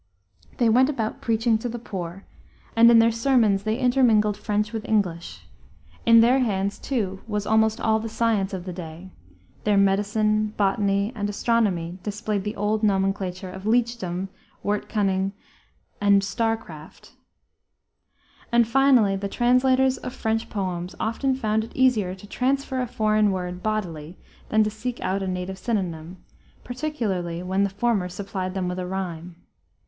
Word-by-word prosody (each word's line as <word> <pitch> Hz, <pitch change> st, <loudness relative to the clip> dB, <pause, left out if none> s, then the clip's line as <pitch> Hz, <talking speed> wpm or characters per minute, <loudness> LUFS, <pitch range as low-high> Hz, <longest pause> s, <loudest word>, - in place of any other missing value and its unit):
They 240 Hz, -, +3 dB
went 255 Hz, +4 st, +4 dB
about 225 Hz, -7 st, -3 dB
preaching 225 Hz, 0 st, +1 dB
to 245 Hz, -, -4 dB
the 240 Hz, -, -5 dB
poor, 190 Hz, -4 st, -7 dB, 0.5 s
and 230 Hz, +1 st, +7 dB
in 235 Hz, -, +7 dB
their 230 Hz, 0 st, +5 dB
sermons 230 Hz, -4 st, +2 dB
they 215 Hz, +2 st, -1 dB
intermingled 240 Hz, -5 st, +3 dB
French 210 Hz, +1 st, -2 dB
with 220 Hz, -1 st, -3 dB
English. 180 Hz, -6 st, -1 dB, 0.6 s
In 230 Hz, 0 st, +8 dB
their 245 Hz, +3 st, +4 dB
hands, 200 Hz, -5 st, -1 dB
too, 195 Hz, -8 st, -2 dB
was 210 Hz, -2 st, -2 dB
almost 220 Hz, +1 st, +2 dB
all 220 Hz, 0 st, +2 dB
the 225 Hz, +1 st, -5 dB
science 220 Hz, -3 st, 0 dB
of 185 Hz, -2 st, -5 dB
the 180 Hz, -, -5 dB
day; 170 Hz, +1 st, -9 dB, 0.5 s
their 210 Hz, -1 st, +2 dB
medicine, 210 Hz, +2 st, +1 dB
botany, 200 Hz, 0 st, +1 dB
and 205 Hz, -3 st, -3 dB
astronomy 195 Hz, -6 st, 0 dB
displaced 210 Hz, 0 st, -3 dB
the 210 Hz, -, -3 dB
old 210 Hz, +1 st, 0 dB
nomenclature 195 Hz, -2 st, -1 dB
of 190 Hz, +1 st, -9 dB
leechdom, 220 Hz, -6 st, 0 dB, 0.3 s
wort 205 Hz, 0 st, -2 dB
cunning, 195 Hz, -2 st, 0 dB, 0.7 s
and 200 Hz, -1 st, +4 dB
star 225 Hz, +4 st, 0 dB
craft. 155 Hz, -7 st, -13 dB, 1.4 s
And, 235 Hz, -1 st, +4 dB
finally, 250 Hz, -5 st, +4 dB
the 200 Hz, +1 st, -3 dB
translators 255 Hz, +3 st, +3 dB
of 250 Hz, -, -6 dB
French 225 Hz, -2 st, -1 dB
poems 180 Hz, -3 st, -4 dB
often 260 Hz, +4 st, 0 dB
found 220 Hz, -4 st, 0 dB
it 225 Hz, -, -11 dB
easier 220 Hz, -8 st, +2 dB
to 190 Hz, -, -13 dB
transfer 260 Hz, +4 st, -1 dB
a 250 Hz, -, -2 dB
foreign 215 Hz, -2 st, +2 dB
word 180 Hz, -1 st, -4 dB
bodily 180 Hz, -6 st, -3 dB, 0.3 s
than 220 Hz, 0 st, +4 dB
to 215 Hz, -, -1 dB
seek 240 Hz, +3 st, -5 dB
out 195 Hz, +1 st, -1 dB
a 190 Hz, -, -3 dB
native 185 Hz, +1 st, -4 dB
synonym, 180 Hz, -7 st, -3 dB, 0.5 s
particularly 210 Hz, -, -3 dB
when 190 Hz, +2 st, 0 dB
the 200 Hz, -, +1 dB
former 200 Hz, -2 st, 0 dB
supplied 185 Hz, 0 st, -5 dB
them 185 Hz, -2 st, -1 dB
with 180 Hz, +1 st, -3 dB
a 180 Hz, -, -4 dB
rhyme. 180 Hz, -2 st, -5 dB
210 Hz, 155 wpm, -24 LUFS, 190-230 Hz, 1.4 s, In